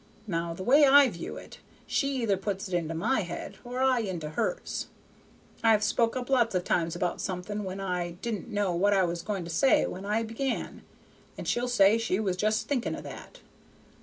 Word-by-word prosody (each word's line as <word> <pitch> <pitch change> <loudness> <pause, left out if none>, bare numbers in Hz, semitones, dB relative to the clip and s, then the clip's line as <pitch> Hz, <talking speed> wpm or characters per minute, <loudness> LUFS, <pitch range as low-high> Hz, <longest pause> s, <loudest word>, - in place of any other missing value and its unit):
Now 170 -4 -2
the 185 - -6
way 280 +8 +6
I 280 0 +7
view 170 -3 -7
it, - - -11 0.3
she 275 -3 0
either 205 -3 +2
puts 195 +1 -3
it 185 - -8
into 165 -2 -1
my 220 +10 +1
head 175 -4 -5
or 250 +1 -2
I 260 -2 +3
into 175 -8 -4
hers. - - -2 0.8
I've 220 -2 +4
spoke 230 +2 +1
up 250 -1 -4
lots 240 -6 +2
of 180 - +1
times 170 -1 0
about 175 0 -2
something, 195 +3 -4
when 190 0 -5
I 180 -3 -2
didn't 235 0 -3
know 205 -4 0
what 200 +4 +3
I 195 -1 +4
was 170 -1 -2
going 200 -2 -3
to 170 - -6
say 265 +11 +4
when 185 - -6
I 210 +3 0
began, 230 +4 -3 0.6
and - - -6
she'll 245 +1 0
say 220 -2 +5
she 225 -4 0
was 195 -4 0
just 215 +4 0
thinking 265 -5 -1
of - - -8
that. - - -10
205 Hz, 200 wpm, -28 LUFS, 180-240 Hz, 0.8 s, I